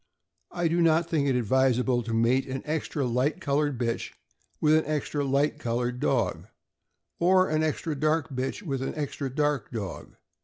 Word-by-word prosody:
I 175 Hz, -1 st, -1 dB
do 170 Hz, +2 st, +1 dB
not 165 Hz, 0 st, +3 dB
think 150 Hz, -4 st, +1 dB
it 135 Hz, -, +2 dB
advisable 125 Hz, +1 st, +2 dB
to 115 Hz, 0 st, -6 dB
mate 115 Hz, +4 st, +2 dB
an 135 Hz, 0 st, -4 dB
extra 150 Hz, -2 st, -2 dB
light 125 Hz, +7 st, 0 dB
colored 145 Hz, -4 st, 0 dB
bitch 115 Hz, -1 st, -2 dB, 0.5 s
with 155 Hz, 0 st, +4 dB
an 155 Hz, 0 st, +4 dB
extra 150 Hz, -1 st, -1 dB
light 140 Hz, +2 st, +1 dB
colored 120 Hz, +1 st, -2 dB
dog, 130 Hz, -4 st, 0 dB, 0.7 s
or 185 Hz, +2 st, +4 dB
an 155 Hz, 0 st, +1 dB
extra 155 Hz, +1 st, -1 dB
dark 155 Hz, +2 st, +1 dB
bitch 130 Hz, +9 st, -3 dB
with 135 Hz, -7 st, -3 dB
an 135 Hz, -, -3 dB
extra 145 Hz, -2 st, -3 dB
dark 145 Hz, -3 st, 0 dB
dog. 105 Hz, -5 st, -6 dB
140 Hz, 165 wpm, -27 LUFS, 125-155 Hz, 0.7 s, with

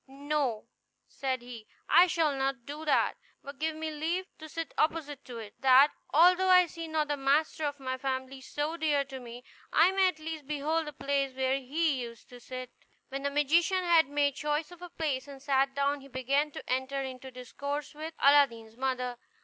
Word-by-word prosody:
"No," 275 Hz, -4 st, -2 dB, 0.4 s
said 260 Hz, -2 st, -3 dB
he, 235 Hz, -3 st, -10 dB, 0.2 s
"I 350 Hz, +2 st, +7 dB
shall 325 Hz, -4 st, +1 dB
not 270 Hz, -2 st, -2 dB
do 300 Hz, +2 st, -7 dB
that; 300 Hz, -, +2 dB, 0.3 s
but 280 Hz, 0 st, -10 dB
give 315 Hz, 0 st, -1 dB
me 315 Hz, 0 st, -4 dB
leave 330 Hz, +5 st, -2 dB
to 315 Hz, 0 st, -9 dB
sit 330 Hz, +1 st, -5 dB
opposite 305 Hz, -3 st, -1 dB
to 245 Hz, -2 st, -8 dB
it, 215 Hz, -2 st, -8 dB
that, 270 Hz, +2 st, +6 dB, 0.2 s
although 360 Hz, +4 st, +5 dB
I 365 Hz, -1 st, +7 dB
see 330 Hz, -1 st, -7 dB
not 315 Hz, -1 st, 0 dB
the 290 Hz, -, 0 dB
master 295 Hz, +3 st, +1 dB
of 285 Hz, -1 st, -3 dB
a 260 Hz, -1 st, -4 dB
family 265 Hz, 0 st, -3 dB
so 295 Hz, +5 st, -3 dB
dear 300 Hz, -3 st, +2 dB
to 265 Hz, -1 st, -8 dB
me, 245 Hz, 0 st, -10 dB, 0.3 s
I 335 Hz, +4 st, +5 dB
may 385 Hz, 0 st, +4 dB
at 365 Hz, -4 st, -1 dB
least 315 Hz, -2 st, -6 dB
behold 305 Hz, +2 st, -1 dB
the 300 Hz, -, -6 dB
place 275 Hz, -1 st, -1 dB
where 265 Hz, +1 st, +1 dB
he 285 Hz, +1 st, 0 dB
used 235 Hz, -1 st, -9 dB
to 245 Hz, -, -12 dB
sit." 255 Hz, +1 st, -7 dB, 0.4 s
When 275 Hz, 0 st, -4 dB
the 280 Hz, -, 0 dB
magician 330 Hz, +6 st, +2 dB
had 335 Hz, -4 st, +5 dB
made 285 Hz, -1 st, +1 dB
choice 300 Hz, +3 st, -2 dB
of 355 Hz, -1 st, -13 dB
a 355 Hz, -, -8 dB
place, 290 Hz, -6 st, -2 dB
and 280 Hz, -1 st, -10 dB
sat 270 Hz, -1 st, +1 dB
down, 280 Hz, 0 st, 0 dB
he 275 Hz, -, -13 dB
began 275 Hz, +3 st, 0 dB
to -, -, -10 dB
enter 260 Hz, +2 st, -1 dB
into 260 Hz, 0 st, -7 dB
discourse 280 Hz, +4 st, -5 dB
with 315 Hz, +2 st, -7 dB
Aladdin's 240 Hz, -6 st, +4 dB
mother. 250 Hz, -2 st, -2 dB
285 Hz, 200 wpm, -30 LUFS, 260-315 Hz, 0.4 s, I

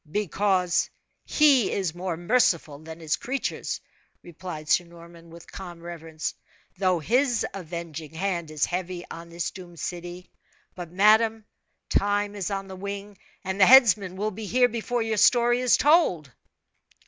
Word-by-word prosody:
"Because 190 Hz, -1 st, +1 dB, 0.4 s
He 280 Hz, -7 st, +4 dB
is 185 Hz, -5 st, -1 dB
more 175 Hz, -1 st, -4 dB
merciful 170 Hz, -7 st, +1 dB
than 160 Hz, +1 st, -10 dB
his 155 Hz, -2 st, -1 dB
creatures," 270 Hz, +2 st, -3 dB, 0.4 s
replied 170 Hz, -2 st, -8 dB
Sir 175 Hz, -, +3 dB
Norman, 170 Hz, 0 st, -15 dB
with 170 Hz, 0 st, -14 dB
calm 175 Hz, -3 st, -9 dB
reverence, 165 Hz, -2 st, -6 dB, 0.5 s
"though 185 Hz, -2 st, +2 dB
His 240 Hz, -, +1 dB
avenging 165 Hz, -4 st, -7 dB
hand 175 Hz, -2 st, -2 dB
is 155 Hz, -2 st, 0 dB
heavy 180 Hz, 0 st, -4 dB
on 170 Hz, 0 st, -9 dB
this 170 Hz, 0 st, -4 dB
doomed 175 Hz, -3 st, -12 dB
city. 175 Hz, +1 st, -6 dB, 0.4 s
But, 175 Hz, -2 st, -8 dB
madame, 215 Hz, +3 st, +4 dB, 0.4 s
time 205 Hz, 0 st, 0 dB
is 200 Hz, -2 st, -3 dB
on 195 Hz, -1 st, -4 dB
the 190 Hz, -, -8 dB
wing, 200 Hz, +1 st, -6 dB, 0.3 s
and 190 Hz, +1 st, -3 dB
the 190 Hz, -, +8 dB
headsman 215 Hz, -8 st, +6 dB
will 210 Hz, +3 st, -2 dB
be 215 Hz, +1 st, -7 dB
here 250 Hz, +4 st, +4 dB
before 235 Hz, +1 st, -2 dB
your 220 Hz, -1 st, -2 dB
story 240 Hz, +3 st, +4 dB
is 250 Hz, -1 st, +4 dB
told." 280 Hz, -, +3 dB
185 Hz, 150 wpm, -25 LUFS, 170-215 Hz, 0.5 s, the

